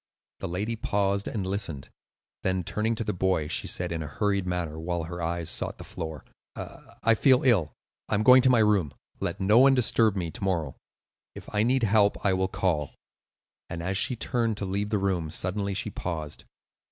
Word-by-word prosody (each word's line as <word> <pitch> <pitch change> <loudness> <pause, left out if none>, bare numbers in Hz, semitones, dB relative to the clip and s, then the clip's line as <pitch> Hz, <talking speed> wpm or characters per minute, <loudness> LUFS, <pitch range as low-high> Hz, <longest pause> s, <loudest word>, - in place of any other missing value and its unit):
The - - -4
lady 105 +7 -2
paused 100 -2 0
and 100 -4 -3
listened, 95 -8 -3 0.5
then 95 -1 0
turning 110 +6 -1
to 115 - -3
the - - -2
boy 90 -4 0
she 80 - -1
said - - -3
in 85 -1 -2
a 75 - -5
hurried 100 +4 -1
manner, 85 -3 -3
while 85 +1 -2
her 85 +2 -6
eyes 85 0 -2
sought - - -2
the - - -9
floor: 80 -2 -7 0.3
"I 115 - -2
feel 130 +3 +4
ill; 95 - +3 0.4
I - - +1
am 105 - +1
going 130 +2 +8
to 130 - +4
my 120 -3 +5
room. 100 -9 +2 0.3
Let 85 +3 -3
no 105 +4 +5
one 135 +1 +6
disturb 115 -3 +3
me 85 -4 -3
to - - -6
morrow; 85 -8 -1 0.6
if - - -11
I 105 - +2
need 125 +3 +2
help 105 -1 +3
I 95 - +4
will 95 0 +1
call." 95 -7 -1 0.7
And 85 0 -5
as 95 +2 -1
she 120 +6 +2
turned 115 -2 -1
to 100 - -3
leave 100 +2 -2
the 105 - +1
room, 95 -5 -1
suddenly 95 +4 -2
she - - -1
paused. 80 -4 -5
95 Hz, 200 wpm, -27 LUFS, 85-110 Hz, 0.7 s, going